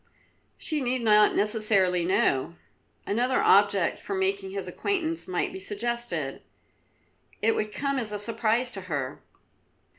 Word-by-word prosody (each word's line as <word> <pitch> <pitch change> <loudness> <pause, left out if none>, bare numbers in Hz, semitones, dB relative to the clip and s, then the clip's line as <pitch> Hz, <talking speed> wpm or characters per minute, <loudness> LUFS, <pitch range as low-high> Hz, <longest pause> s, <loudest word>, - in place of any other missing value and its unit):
"She 305 -2 -2
need 250 -1 0
not 210 -1 +5
necessarily 205 -4 +3
know. 170 -4 +1 0.5
Another 245 +5 +1
object 435 +1 +3
for 395 - -5
making 385 0 -1
his 405 +1 -5
acquaintance 330 -5 -2
might 180 -1 -2
be - - -6
suggested. 205 - -3 1.0
It 225 +1 +2
would 215 0 -2
come 275 +3 -1
as 220 -4 -1
a 210 - -3
surprise 230 +3 0
to 195 - -6
her." 140 -4 -3
225 Hz, 130 wpm, -26 LUFS, 195-270 Hz, 1.0 s, not